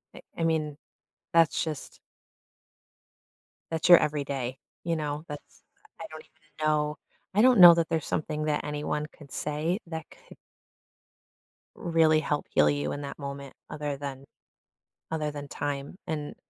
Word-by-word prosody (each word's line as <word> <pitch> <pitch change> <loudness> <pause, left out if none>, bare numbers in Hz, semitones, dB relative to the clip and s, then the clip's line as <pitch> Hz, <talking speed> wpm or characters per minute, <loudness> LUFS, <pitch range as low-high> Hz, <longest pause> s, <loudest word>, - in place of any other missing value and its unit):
I - - -10 0.2
I 165 - -1
mean, 155 -3 0 0.6
that's 165 -2 +4
just 155 -3 -6 1.7
that's 160 +2 0
your 175 - +11
every 150 -1 0
day, 130 -2 -3 0.3
you 165 -1 0
know? 150 0 -3
That's 145 - -10 0.4
I 165 - -5
don't 155 0 -8
even 155 0 -7
know 150 0 +1 0.4
I 210 - +4
don't 250 -3 +6
know 175 -1 +12
that 165 -1 +1
there's 160 -3 -1
something 155 0 -2
that 150 -1 0
anyone 150 0 -2
could 145 -3 -14
say 155 +6 -1
that 160 -1 -5 0.2
could - - -13 1.4
really 160 -2 +3
help 150 -1 -1
heal 75 - +4
you 75 0 -1
in 145 - -4
that 140 - -6
moment 140 -1 -7 0.2
other 145 -2 -3
than 140 -1 -7 0.9
other 155 -2 -1
than 145 -1 -7
time, 145 +3 -4
and, 150 -2 -4
150 Hz, 150 wpm, -28 LUFS, 145-160 Hz, 1.7 s, know